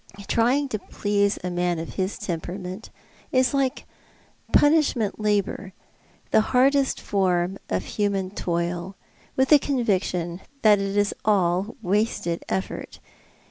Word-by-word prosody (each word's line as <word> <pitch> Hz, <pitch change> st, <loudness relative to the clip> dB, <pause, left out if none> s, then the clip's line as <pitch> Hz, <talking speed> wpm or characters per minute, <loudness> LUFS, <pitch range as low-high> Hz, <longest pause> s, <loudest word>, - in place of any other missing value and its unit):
Trying 255 Hz, +5 st, +2 dB
to 215 Hz, -, -2 dB
please 205 Hz, 0 st, 0 dB
a 180 Hz, -, -2 dB
man 175 Hz, 0 st, 0 dB
of 165 Hz, +1 st, -6 dB
his 190 Hz, +1 st, -2 dB
temperament 180 Hz, +4 st, -5 dB, 0.4 s
is 255 Hz, -1 st, +3 dB
like 270 Hz, -2 st, 0 dB, 0.7 s
punish 305 Hz, 0 st, +4 dB
ment 220 Hz, -4 st, -2 dB
labour 205 Hz, -2 st, -1 dB, 0.3 s
— -, -, -34 dB
the -, -, +5 dB
hardest 265 Hz, +4 st, +2 dB
form 185 Hz, -1 st, 0 dB
of 95 Hz, 0 st, -1 dB
human 200 Hz, -3 st, -1 dB
toil 175 Hz, 0 st, -2 dB, 0.2 s
— -, -, -31 dB
with 265 Hz, 0 st, +3 dB
the 300 Hz, -, +8 dB
con 265 Hz, -4 st, -1 dB
viction 180 Hz, -4 st, -1 dB, 0.2 s
that 210 Hz, -2 st, +6 dB
it 195 Hz, +1 st, -2 dB
is 205 Hz, 0 st, +2 dB
all 190 Hz, 0 st, +1 dB
wasted 185 Hz, -3 st, 0 dB
effort. 190 Hz, -, -4 dB
200 Hz, 140 wpm, -24 LUFS, 180-230 Hz, 0.7 s, the